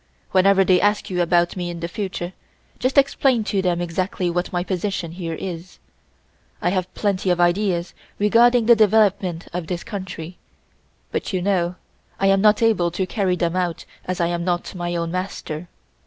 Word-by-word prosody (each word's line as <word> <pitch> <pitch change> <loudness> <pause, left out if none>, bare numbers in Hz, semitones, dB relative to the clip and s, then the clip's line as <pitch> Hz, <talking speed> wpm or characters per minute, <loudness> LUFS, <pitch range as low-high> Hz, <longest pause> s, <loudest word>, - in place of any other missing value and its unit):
Whenever 195 +1 +5
they 185 -1 +4
ask 205 0 +1
you 180 -1 0
about 175 0 +2
me 175 -2 -3
in 170 -1 -6
the 170 - -3
future 180 -1 -4 0.5
just 255 +3 0
explain 270 -3 +3
to 200 -2 0
them 180 -2 0
exactly 175 +1 -2
what 175 +2 -2
my 175 -1 -1
position 185 -2 -3
here 165 -2 -5
is. 175 0 -7 0.8
I 175 - +1
have 185 -1 -1
plenty 195 -2 0
of 175 -1 +2
ideas 175 0 +1 0.2
regarding 235 +3 +4
the 235 +1 +7
development 200 -5 +2
of 175 -2 -4
this 175 0 -3
country 185 -4 -7 0.7
but - - -3
you 185 - +1
know 180 -3 +1 0.4
I 195 - +1
am 195 0 +4
not 210 +2 +4
able 210 -7 +3
to 180 +2 -2
carry 190 -2 0
them 170 -1 -1
out 180 -2 -2 0.2
as 185 +1 -4
I 170 - +2
am 170 0 -1
not 175 0 -2
my 175 -1 -3
own 170 -1 -2
master. 180 -3 -4
185 Hz, 180 wpm, -22 LUFS, 175-200 Hz, 0.8 s, the